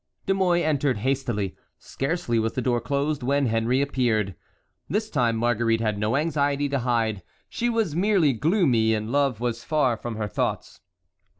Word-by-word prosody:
De 195 - +2
Mouy 180 -3 +2
entered 145 -5 +1
hastily. 120 -5 -1 0.2
Scarcely 135 -5 -2
was 110 0 -1
the 130 - -2
door 120 -1 +1
closed 140 +3 -1
when 140 +3 +1
Henry 115 +3 +1
appeared. 115 -8 0 0.6
This 215 +2 -1
time 120 -6 +1
Marguerite 115 0 +1
had 110 -2 -1
no 105 +4 0
anxiety 145 -2 +1
to 140 -1 0
hide—she 115 - -2
was 225 -10 0
merely 180 -6 +3
gloomy, 125 - +2
and 110 +1 -4
love 140 -5 +1
was 120 -1 -2
far 140 -6 +1
from 115 +1 -6
her 105 -1 -2
thoughts. 100 - -3
130 Hz, 160 wpm, -25 LUFS, 115-150 Hz, 0.6 s, merely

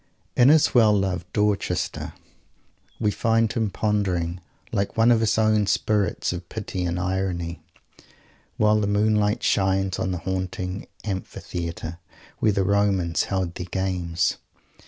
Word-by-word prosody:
In 125 +2 +6
his 155 0 +5
well 110 -4 +6
loved 90 -3 -2
Dorchester 105 -1 -1 0.9
we 105 -2 +2
find 115 0 +1
him 110 -3 0
pondering, 95 -5 -1 0.3
like 100 -1 -2
one 115 +2 +5
of 115 - +4
his 110 -1 +1
own 110 -2 +3
spirits 100 -5 0
of 85 -1 -7
Pity 95 -4 -4
and 85 +1 -1
Irony, 90 -2 -2 1.0
while 105 0 +4
the 100 - 0
moonlight 105 0 +2
shines 95 -1 +1
on - - -1
the 90 - -2
haunted 95 +1 -4 0.2
amphitheatre 85 -4 -5 0.4
where 110 - +3
the 100 -1 +1
Romans 95 -4 +1
held 95 -3 -2
their 90 0 -6
games. 90 -2 -1
95 Hz, 135 wpm, -24 LUFS, 90-105 Hz, 1.0 s, In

